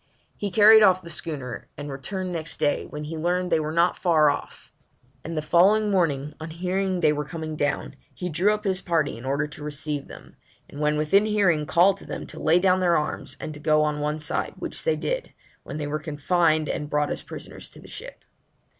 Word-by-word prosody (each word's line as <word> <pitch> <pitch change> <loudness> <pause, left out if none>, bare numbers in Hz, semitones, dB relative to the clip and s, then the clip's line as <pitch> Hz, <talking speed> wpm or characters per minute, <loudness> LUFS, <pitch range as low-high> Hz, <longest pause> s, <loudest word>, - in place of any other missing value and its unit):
He 205 - -3
carried 215 +3 +7
off 185 -3 +5
the 170 - -7
schooner, 140 -7 -5
and 145 0 -6
returned 185 +8 -4
next 165 -2 -3
day, 145 - 0
when 150 0 -7
he 160 +1 -5
learned 180 +2 0
they - - +4
were 155 0 -2
not 170 +2 +3
far 155 -5 +4
off; 145 - -8 0.5
and 165 0 -5
the 155 - -1
following 200 +7 +4
morning, 150 -6 +1
on 160 +1 -6
hearing 185 +2 -1
they 155 -2 +4
were 150 0 -2
coming 155 0 -6
down, 145 -1 -2 0.2
he 180 - -5
drew 180 +5 +2
up 210 0 -2
his 190 -2 0
party 160 -5 0
in 115 +3 -10
order 140 +3 0
to 150 0 -10
receive 150 -1 -3
them, - - -13 0.3
and 145 - -9
when 150 0 +2
within 195 +8 +3
hearing, 185 -8 +2
called 185 +4 +4
to - - -12
them - - -5
to - - -9
lay 165 - +4
down 185 0 +3
their 175 -2 +3
arms 150 - -4
and 155 - -5
to 150 - -10
go 155 0 +3
on 150 -1 -1
one 150 +1 -1
side, 150 -1 -2
which - - -4
they 480 - +3
did, - - -3 0.3
when - - -7
they 150 - -3
were 150 +1 -2
confined 155 +1 +1
and 150 - -3
brought 150 0 0
as - - -4
prisoners - - -9
to - - -14
the - - -14
ship. - - -9
160 Hz, 220 wpm, -25 LUFS, 150-185 Hz, 0.5 s, carried